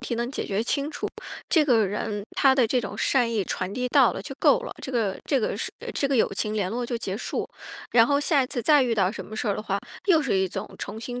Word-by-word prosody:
题 245 -1 -3
能 240 +2 -2
解 - - -3
决 200 +2 -1
清 280 +5 -1
楚， - - -4 0.4
这 315 -3 +4
个 230 -7 +4
人 205 +1 -3
他 270 -2 +4
的 255 -4 +4
这 250 +2 +1
种 200 - -6
善 245 -4 +2
意 215 -3 +1
传 185 +2 -3
递 250 +2 -2
到 - - +5
了 - - -5
就 - - -7
够 - - +5
了， - - -6
这 265 - -5
个 215 -5 0
这 275 - +1
个 225 - -1 0.4
这 280 - +1
个 270 - +1
友 220 - +2
情 215 +2 -2
联 195 -3 -1
络 240 +3 -2
就 240 0 -2
结 195 -3 -3
束。 - - -3 0.4
然 230 -1 +6
后 285 0 +2
下 290 -2 +3
一 - - -2
次 250 -2 -3
再 295 +2 +5
遇 240 -2 +1
到 195 -3 +2
什 - - -7
么 215 - -9
事 220 - -1
儿 200 - +1
的 - - -4
话， 200 -2 -1 0.3
又 335 -5 +5
是 240 -8 +1
一 190 0 +2
种 - - -5
重 215 +2 -6
新 245 +1 -5
235 Hz, 295 characters per minute, -25 LUFS, 205-265 Hz, 0.4 s, 然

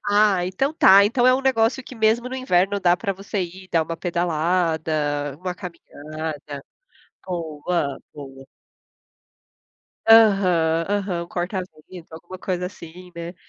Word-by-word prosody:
Ah, 205 -3 +3
então 270 +11 -1
tá, 200 -7 +7
então 245 +4 +2
é 255 - +6
um 265 - -1
negócio 260 -1 +1
que 255 - -11
mesmo 225 +2 +1
no 260 - -6
inverno, 200 -5 +1
dá 175 -1 +3
pra 195 - -2
você 195 +1 -5
ir, 185 +2 -9
dar 165 - +2
uma 165 +1 -5
pedalada, 160 -4 -1
uma 180 +1 -4
caminhada 155 -5 -8 0.6
Boa, 160 -4 -3
boa. 135 -2 -11 1.6
Aham, 185 -7 +5
aham. 195 -4 -2
Um - - -15
corta-vento, 180 -2 -6
alguma 175 +3 -10
coisa 180 -1 -3
assim, 180 -1 -12
né. 170 +1 -7
180 Hz, 135 wpm, -22 LUFS, 160-200 Hz, 1.6 s, tá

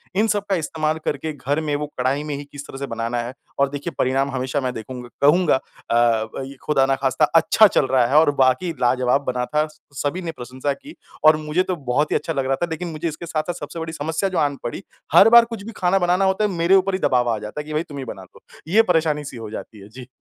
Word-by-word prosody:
इन 215 +3 +3
सब 205 -2 0
का 195 - +3
इस्तेमाल 155 -1 -1
करके 160 - -2
घर 145 +1 -2
में 150 -2 -1
वो 150 0 -3
कढ़ाई 135 +4 0
में 150 -1 -4
ही 145 - -6
किस 145 0 -9
तरह - - -9
से 140 - -4
बनाना 115 +1 -3
है 120 +2 -6 0.3
और 140 0 +3
देखिए 145 +4 -5
परिणाम 135 +2 +1
हमेशा 130 +2 -2
मैं 125 -1 -2
देखूँगा 125 +2 -8
कहूँगा 155 +3 +4
अ, 115 - -5 0.4
वई 135 +1 -6
खुदा 135 -3 +3
न 135 - +3
ख़ास्ता 135 +3 +3
अच्छा 165 +6 +6
चल 150 - +2
रहा 130 -2 +3
है 135 - 0
और 155 -2 +4
बाकी 130 +7 +2
लाजवाब 125 +2 +2
बना 125 0 -2
था। 150 +3 0 0.3
सभी 145 +6 -2
ने 165 - -4
प्रशंसा 130 +3 -3
की 290 +3 -13 0.3
और 155 0 +7
मुझे 175 +5 +2
तो 185 - -2 0.2
बहुत 150 +4 +1
ही - - +2
अच्छा 165 - -1
लग 135 -2 -1
रहा 135 - +1
था 175 +6 -2
लेकिन 170 +2 -4
मुझे 155 +1 -3
इसके 160 +1 -6
साथ, 155 -2 -2
साथ 175 - -3
सबसे 170 - -7
बड़ी 160 0 -5
समस्या 160 +5 -2
जो 185 - -3
आन 145 -2 +1
पड़ी 185 - -5 0.3
हर 215 - +8
बार 235 0 +8
कुछ 230 -3 -7
भी 230 - -7
खाना 185 +2 +2
बनाना 180 +2 +2
होता 190 +2 +1
है - - +1
मेरे 170 +1 +3
ऊपर 195 0 +2
ही 185 - 0
दबाव 125 -5 +2
आ 115 - +1
जाता 105 +8 -6
है - - -12
कि 155 - -7
भई 155 +2 0
तुम 145 - -8
ही 135 - -5
बना 95 -5 -8
लो। - - -18 0.3
ये 205 +7 +5
परेशानी 160 -5 +1
सी 130 - -8
हो 110 -2 -7
जाती 110 0 -8
है। 100 - -12
जी। 125 +2 -11
150 Hz, 265 wpm, -22 LUFS, 130-170 Hz, 0.4 s, हर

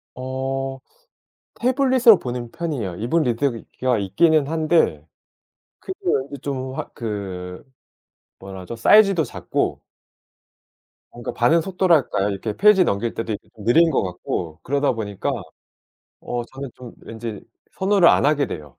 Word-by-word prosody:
어. 135 +1 -4 0.8
태블릿으로 255 -4 +4
보는 120 -1 -5
편이에요. 135 - -4
이북 120 - 0
리더기가 125 -1 -1
있기는 145 - +2
한데 160 +1 +1 0.7
크기 380 - -7
말고 140 - -1
좀 130 -1 -5
아 - - -4
그 95 -5 -6 0.8
뭐라 95 -1 -9
하죠? 115 +6 -7
사이즈도 195 - +5
작고 - - -3 1.3
뭔가 120 - -6
반응 160 +8 +3
속도랄까요? 165 - +1
이렇게 100 +2 -3
페이지 210 -2 +5
넘길 115 - -1
때도 115 -1 -3
이게 105 - -9
느린 120 +11 +4
것 - - +1
같고 90 -3 -4
그러다 140 +1 +1
보니까 110 +4 -3 0.9
어 120 -1 -4
저는 135 +1 -8
좀 125 -2 -11
왠지 110 -2 -7 0.4
선호를 190 -2 +4
안 - - +4
하게 145 -2 +2
돼요. 75 -8 -8
130 Hz, 275 characters per minute, -22 LUFS, 110-160 Hz, 1.3 s, 사이즈도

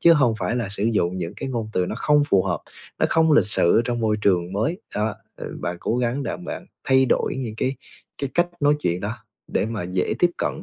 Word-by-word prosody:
chứ 170 - +7
hông 130 -8 +4
phải 95 +6 -1
là 115 -5 -1
sử 100 +1 -3
dụng 95 -6 +1
những 85 -1 -3
cái - - -4
ngôn 115 -4 -3
từ 90 -1 +1
nó - - -3
không 150 -1 +4
phù 95 -1 +4
hợp, - - -1 0.4
nó - - +3
không 160 -1 +4
lịch 145 - +5
sự 85 -4 +3
ở 115 - +3
trong 120 0 -1
môi 110 -1 +2
trường 90 -2 +2
mới. 160 - -1
Đó, 105 +1 0 0.2
ờ, - - -6
bạn 90 - -2
cố 120 - 0
gắng 125 +3 0
đặng 180 - -4
bạn 180 - -6 0.2
thay 130 -1 +5
đổi - - +1
những 120 -5 -4
cái 130 +3 -1 0.4
cái 140 -2 -3
cách 175 0 +3
nói 145 +1 +4
chuyện 90 +1 0
đó 105 +4 -3 0.3
để - - 0
mà 110 -4 -3
dễ 90 +1 -1
tiếp 175 -1 +4
cận 160 - -2
115 Hz, 250 wpm, -23 LUFS, 100-140 Hz, 0.4 s, chứ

